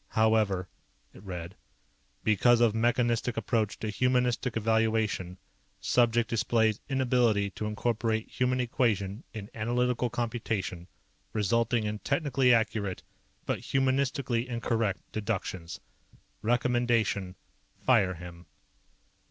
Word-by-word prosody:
"However," 110 -4 +3 0.5
it - - -14
read, 90 -3 -7 0.7
"_because 115 +3 +4
of 120 -3 +4
mechanistic 120 +1 +1
approach 110 -1 0
to 110 - -3
humanistic 125 0 +1
evaluation, 110 -4 0 0.4
subject 120 -1 +2
displays 110 -1 +1
inability 120 -6 +2
to 105 - -4
incorporate 110 0 -1
human 125 0 0
equation 115 -4 0
in 105 -2 -8
analytical 120 +2 0
computation, 110 -7 -3 0.5
resulting 115 +2 +1
in 105 0 -3
technically 140 -2 +2
accurate 110 -4 +1 0.4
but - - -1
humanistically 135 -2 0
incorrect 115 -4 -1
deductions._ 95 -5 -4 0.6
"_Recommendation: 120 -5 +1 0.4
Fire 100 -8 +3
him. 85 0 -11
115 Hz, 95 wpm, -29 LUFS, 105-120 Hz, 0.7 s, because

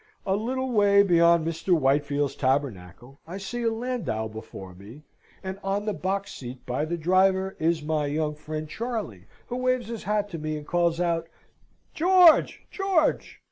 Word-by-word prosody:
a 190 - +1
little 260 +5 -2
way 200 -2 +5
beyond 170 -3 +4
Mr. 165 +2 +1
Whitefield's 145 0 +1
Tabernacle, 130 - -2
I 180 +3 -6
see 240 +5 -5
a 230 -1 +1
landau 225 - -3
before 110 -4 -10
me, 105 +11 -13 0.4
and 190 +1 -5
on 200 +1 -1
the 210 - -1
box 195 +2 -3
seat 125 0 -9
by 130 +5 -1
the 170 +2 -3
driver 190 +3 +2
is 160 -1 +1
my 150 -1 -1
young 150 +1 -1
friend 155 +1 -6
Charley, 210 - -5 0.2
who 245 - -5
waves 255 -2 0
his 230 -2 -6
hat 210 0 0
to 170 -4 -6
me 155 0 -3
and 150 - -9
calls 170 0 +1
out, 170 -2 0 0.7
"George! 350 -1 +5
George!" 385 -5 0
170 Hz, 165 wpm, -26 LUFS, 145-210 Hz, 0.7 s, way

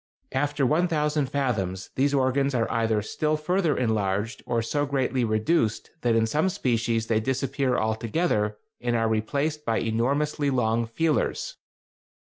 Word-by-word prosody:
After 145 +1 0
1000 150 -1 +1
fathoms 105 -9 -2
these 140 +2 +2
organs 135 0 +1
are 115 -2 +2
either 110 -2 +1
still 155 +7 -1
further 165 +1 +1
enlarged 105 -2 -1
or 115 -2 0
so 145 +5 -1
greatly 130 -2 0
reduced 110 +2 0
that 120 -2 +2
in 115 0 +3
some 150 +11 +1
species 115 -7 0
they 110 -1 +1
disappear 130 +2 0
altogether 110 0 0 0.2
and 120 -1 -1
are 115 -1 +2
replaced 140 +8 -1
by 115 -5 0
enormously 140 +6 0
long 115 -3 +1
feelers. 165 - -1
125 Hz, 135 wpm, -26 LUFS, 110-145 Hz, 0.2 s, in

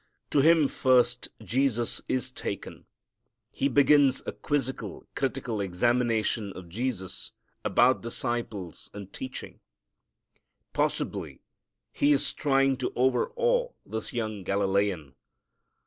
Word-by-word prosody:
To 145 - +4
him 160 -1 +5
first 125 -2 +2
Jesus 120 +2 0
is 130 0 -1
taken. 100 - -6 0.6
He 140 - 0
begins 140 0 +5
a - - -2
quizzical, 135 -3 -3
critical 125 -5 -2
examination 110 +2 +1
of 90 -2 -10
Jesus 105 -1 -3 0.3
about 125 +2 +4
disciples 115 -6 -3
and 100 -1 -9
teaching. 130 0 -7 1.1
Possibly - - -2 0.5
he 145 +1 +3
is 140 - +1
trying 135 -2 +2
to 130 - -2
overawe 485 - +1
this 110 0 -5
young 110 -3 -3
Galilean. 100 -6 0
125 Hz, 100 wpm, -28 LUFS, 105-135 Hz, 1.1 s, him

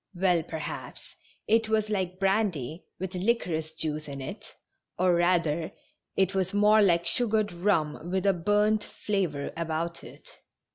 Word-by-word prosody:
Well, 180 -2 +3
per 160 0 -6
haps 155 - -7 0.3
it 225 0 +3
was 215 -1 +1
like 185 -3 -1
brandy 190 - 0
with 190 +1 -4
liquorice 180 -6 -1
juice 155 -1 -3
in 140 -1 -6
it, 130 - -7 0.5
or, 180 0 +3
rather, 170 -2 +2 0.5
it 190 0 +2
was 190 0 -1
more 210 +1 +5
like 170 -4 +3
sugared 220 -3 +1
rum 170 -3 0
with 190 +1 -1
a 195 - +5
burnt 210 +4 +2
fla 200 -3 -1
vor 140 -2 -5
about 170 +1 -3
it. - - -13
180 Hz, 150 wpm, -28 LUFS, 165-205 Hz, 0.5 s, more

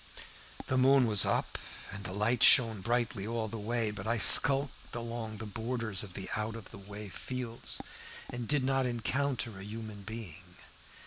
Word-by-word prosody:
"The 130 - 0
moon 135 0 +4
was 105 -4 +5
up, - - -2 0.3
and 100 +1 -8
the 90 - -6
light 105 +5 -1
shone 115 -6 +6
brightly 115 -2 -2
all 115 -1 -3
the 115 +1 -7
way, 115 +1 -2
but 100 0 -8
I 115 +1 0
skulked 135 +5 +6
along 115 -2 -6
the 110 - -8
borders 110 -1 -3
of 95 -4 -9 0.2
out 110 +1 -4
of 115 -3 -11
the - - -12
way 100 +1 -10
fields, 120 +4 -4 0.5
and 120 -2 -7
did 145 -3 +1
not 135 0 0
encounter 120 -2 -3
a - - -9
human 110 0 -9
being. 105 -5 -10
115 Hz, 170 wpm, -30 LUFS, 105-120 Hz, 0.5 s, shone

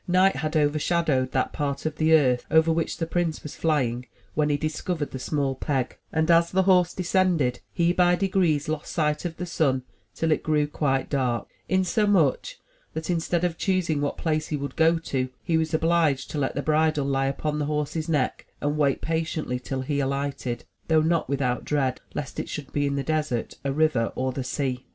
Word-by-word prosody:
Night 185 +2 +4
had 155 0 -1
overshadowed 150 -2 +1
that 130 - 0
part 140 -2 -2
of 155 -1 -2
the 160 0 +2
earth 130 -6 +4
over 160 +1 +4
which 160 0 -1
the 165 - -1
prince 165 -1 -1
was 150 - -7
flying 125 -6 0 0.3
when 150 0 +1
he 145 - +2
discovered 155 +1 -3
the 130 - -5
small 140 +1 -1
peg; 130 -1 -2 0.2
and 160 +1 +2
as 170 0 +5
the 190 +1 +2
horse 180 -2 +4
descended, 180 -8 +1
he 170 -1 +2
by 180 -1 +4
degrees 180 -6 +1
lost 155 -1 -3
sight 150 0 0
of 165 -2 -4
the 180 - -3
sun 135 -7 +1 0.3
till 165 -1 0
it 155 - +2
grew 150 -1 +2
quite 140 -2 0
dark, 125 -4 -1 0.2
insomuch 190 - +2 0.4
that, 160 +2 -3
instead 170 0 0
of 170 -2 -1
choosing 175 -6 +1
what 145 - -1
place 155 -2 -1
he 150 - -2
would 140 -1 -5
go 165 +1 +4
to, 130 -5 -2
he 170 - 0
was 160 0 +1
obliged 160 -4 +1
to 150 - -2
let 135 - -1
the 140 - -2
bridle 155 -2 +2
lie 135 -1 +1
upon 150 +2 -2
the 145 - 0
horse's 150 +2 -2
neck 145 -5 0
and 145 +1 -1
wait 140 -3 +2
patiently 160 -5 -2
till 130 +1 -4
he 145 +2 -1
alighted, 140 -3 -2 0.2
though 160 -1 +4
not 165 +1 +1
with 140 0 0
out 125 -1 0
dread 135 -4 0
lest 145 -2 -4
it - - -4
should 145 -3 -6
be 145 -1 +1
in 140 - -1
the 140 - -1
desert, 155 -6 -1
a 140 - 0
river 145 -5 +2
or 130 0 -1
the 130 +1 -4
sea. 130 -1 -3
150 Hz, 200 wpm, -25 LUFS, 140-165 Hz, 0.4 s, as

